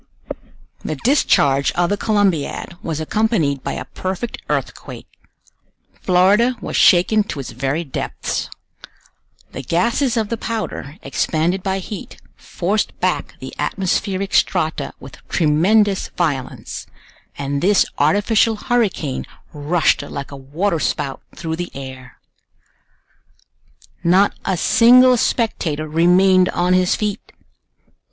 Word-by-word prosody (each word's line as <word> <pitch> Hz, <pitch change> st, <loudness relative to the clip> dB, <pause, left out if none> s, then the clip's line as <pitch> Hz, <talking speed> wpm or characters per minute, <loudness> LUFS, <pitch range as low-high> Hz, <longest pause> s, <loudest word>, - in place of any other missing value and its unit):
The 155 Hz, -, -3 dB
discharge 140 Hz, -, +2 dB
of 175 Hz, +1 st, +1 dB
the -, -, +2 dB
Columbiad 200 Hz, -7 st, 0 dB
was 160 Hz, -2 st, -3 dB
accompanied 160 Hz, -, 0 dB
by -, -, -3 dB
a -, -, -5 dB
perfect 190 Hz, +5 st, -5 dB
earthquake. -, -, -4 dB, 1.0 s
Florida 200 Hz, +7 st, +3 dB
was -, -, -5 dB
shaken 185 Hz, +5 st, +5 dB
to 145 Hz, -, -6 dB
its 135 Hz, -, -6 dB
very 135 Hz, +7 st, -2 dB
depths. 135 Hz, -, -4 dB, 1.0 s
The -, -, -6 dB
gases 235 Hz, -, 0 dB
of 220 Hz, -2 st, 0 dB
the 230 Hz, -, -2 dB
powder, 215 Hz, -, -5 dB
expanded 170 Hz, +4 st, 0 dB
by 190 Hz, +1 st, -1 dB
heat, 195 Hz, +1 st, -8 dB, 0.2 s
forced 200 Hz, +4 st, -2 dB
back -, -, -1 dB
the -, -, -8 dB
atmospheric 195 Hz, +1 st, -1 dB
strata 160 Hz, -4 st, 0 dB
with 130 Hz, -2 st, -12 dB
tremendous 190 Hz, +6 st, +2 dB
violence, 140 Hz, -7 st, -3 dB, 0.5 s
and 140 Hz, 0 st, -2 dB
this 200 Hz, +2 st, +4 dB
artificial 205 Hz, +8 st, +3 dB
hurricane 210 Hz, -, -1 dB, 0.3 s
rushed 155 Hz, +3 st, +1 dB
like 140 Hz, -1 st, -7 dB
a -, -, -7 dB
water 155 Hz, +7 st, -2 dB
spout 135 Hz, +2 st, -2 dB
through 160 Hz, 0 st, -4 dB
the 175 Hz, 0 st, -4 dB
air. 130 Hz, -2 st, -9 dB, 1.9 s
Not 185 Hz, +4 st, +4 dB
a 190 Hz, -, 0 dB
single 250 Hz, +6 st, +6 dB
spectator 165 Hz, -, -1 dB
remained 180 Hz, +4 st, +4 dB
on 180 Hz, +1 st, +1 dB
his 185 Hz, -1 st, +3 dB
feet! 210 Hz, -1 st, -4 dB
180 Hz, 115 wpm, -19 LUFS, 150-205 Hz, 1.9 s, single